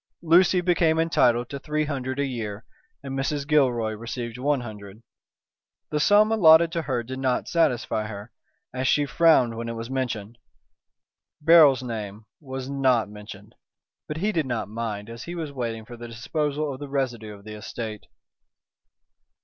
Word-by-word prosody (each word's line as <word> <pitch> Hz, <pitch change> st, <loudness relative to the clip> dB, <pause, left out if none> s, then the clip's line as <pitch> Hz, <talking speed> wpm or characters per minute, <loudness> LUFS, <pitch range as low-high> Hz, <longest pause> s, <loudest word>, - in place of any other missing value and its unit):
Lucy 175 Hz, +2 st, +5 dB
became 170 Hz, -2 st, +2 dB
entitled 125 Hz, -7 st, +2 dB
to 140 Hz, -, -6 dB
three 150 Hz, +2 st, -1 dB
hundred 130 Hz, -3 st, -3 dB
a 140 Hz, -, +1 dB
year, 110 Hz, -5 st, -5 dB, 0.4 s
and 135 Hz, -1 st, -5 dB
Mrs. 140 Hz, +1 st, -2 dB
Gilroy 125 Hz, -7 st, +2 dB
received 115 Hz, +2 st, -6 dB
one 140 Hz, 0 st, +1 dB
hundred. 105 Hz, -2 st, -10 dB, 0.9 s
The 150 Hz, -, 0 dB
sum 210 Hz, +7 st, +5 dB
allotted 165 Hz, -5 st, +6 dB
to 165 Hz, 0 st, -1 dB
her 130 Hz, -5 st, -2 dB
did 130 Hz, +2 st, -7 dB
not 130 Hz, -2 st, 0 dB
satisfy 125 Hz, -9 st, 0 dB
her, 105 Hz, +2 st, -8 dB, 0.4 s
as 130 Hz, +1 st, -1 dB
she 145 Hz, +1 st, +3 dB
frowned 130 Hz, -4 st, +4 dB
when 115 Hz, +1 st, -5 dB
it 115 Hz, -, -4 dB
was 115 Hz, +2 st, -6 dB
mentioned. 120 Hz, -4 st, -3 dB, 1.0 s
Beryl's 150 Hz, -4 st, +6 dB
name 110 Hz, -3 st, -6 dB
was 130 Hz, -3 st, -6 dB
not 130 Hz, -5 st, +1 dB
mentioned, 105 Hz, 0 st, -11 dB, 0.5 s
but 150 Hz, -, -4 dB
he 205 Hz, +6 st, 0 dB
did 160 Hz, -8 st, -1 dB
not 120 Hz, -4 st, -2 dB
mind 105 Hz, -1 st, -5 dB
as 115 Hz, +1 st, -9 dB
he 175 Hz, -, -6 dB
was 160 Hz, -4 st, -4 dB
waiting 115 Hz, -4 st, -4 dB
for 120 Hz, -, -10 dB
the 120 Hz, 0 st, -9 dB
disposal 145 Hz, +5 st, -2 dB
of 130 Hz, -, -9 dB
the 145 Hz, -1 st, -7 dB
residue 120 Hz, -6 st, -3 dB
of 100 Hz, -, -16 dB
the 110 Hz, +1 st, -9 dB
estate. 105 Hz, 0 st, -7 dB
130 Hz, 165 wpm, -25 LUFS, 115-150 Hz, 1.0 s, allotted